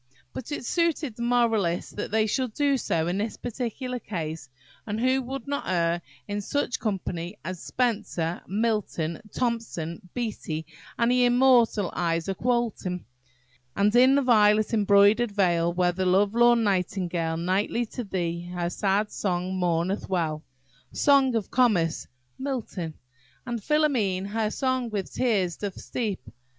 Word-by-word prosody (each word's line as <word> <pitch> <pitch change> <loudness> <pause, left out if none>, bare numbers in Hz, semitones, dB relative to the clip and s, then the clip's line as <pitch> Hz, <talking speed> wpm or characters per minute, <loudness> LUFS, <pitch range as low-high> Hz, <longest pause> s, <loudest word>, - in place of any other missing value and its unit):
But 260 +3 -7
it 290 - -4
suited 325 -6 0
the 235 - -8
moralist 225 -7 +1
that 205 - -4
they 220 +1 +2
should 245 +1 -1
do 285 -1 +2
so 165 -10 0
in 180 +3 -1
this 215 +2 -3
particular 250 +1 -4
case; 160 - -5 0.4
and 210 +1 -2
who 260 +2 +2
would 265 0 -6
not 285 0 -3
err 170 -1 +1 0.3
in 205 0 -2
such 260 +3 -1
company 190 -3 -3
as 185 -2 -5
Spenser, 200 -9 -1
Milton, 200 -6 -1
Thomson, 215 -7 -3
Beattie, 200 -9 -3 0.3
and 235 +1 +3
the 250 0 +4
immortal 245 -5 +4
Isaak 170 +2 -1
Walton? 230 -7 -1 0.7
"And 205 +3 +2
in 255 +2 +6
the 280 - +3
violet 215 -3 +4
embroider'd 205 +2 +4
vale, 175 -4 +2
Where 175 0 +2
the 185 +1 -1
love 200 +3 +3
lorn 240 0 +5
nightingale 180 -4 0
Nightly 190 +7 0
to 245 - -3
thee 175 -3 -3
her 175 0 -1
sad 205 +2 0
song 180 -1 -2
mourneth 180 +2 0
well." 160 -4 -1 0.5
Song 275 -3 +4
of 220 -4 -2
Comus–MILTON. 175 - -1 0.5
"And 240 -3 -3
Philomele 230 -11 +1
her 220 0 0
song 255 0 -1
with 205 -4 -4
teares 195 -9 +1
doth 200 -2 -5
steepe." 210 - -4
210 Hz, 140 wpm, -26 LUFS, 180-240 Hz, 0.7 s, in